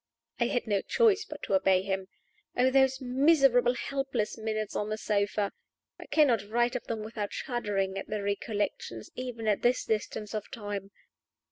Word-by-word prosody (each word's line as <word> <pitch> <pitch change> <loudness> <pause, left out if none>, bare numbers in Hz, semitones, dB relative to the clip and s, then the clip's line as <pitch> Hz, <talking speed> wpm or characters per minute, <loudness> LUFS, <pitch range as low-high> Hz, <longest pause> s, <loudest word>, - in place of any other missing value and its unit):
I 235 - +3
had 245 - -1
no 205 -3 +1
choice 440 -3 +3
but - - -9
to - - -2
obey 190 -1 +4
him. 190 -1 -2 0.5
Oh, 255 +1 +4
those 265 -1 +4
miserable, 260 -2 +4
helpless 265 -6 -2
minutes 215 -1 -3
on 210 - -1
the 215 - -2
sofa! 205 -1 0 0.5
I - - -10
cannot 265 -9 +4
write 240 +2 +2
of 250 - -3
them 225 -2 -3
without 215 -2 -4
shuddering 195 -6 -2
at - - -7
the 210 -1 -3
recollection 200 - -2
even 245 -3 -5
at 210 -2 +2
this 245 +1 +2
distance 215 -1 -2
of 215 -1 -4
time. 205 -3 -5
220 Hz, 165 wpm, -29 LUFS, 205-250 Hz, 0.5 s, obey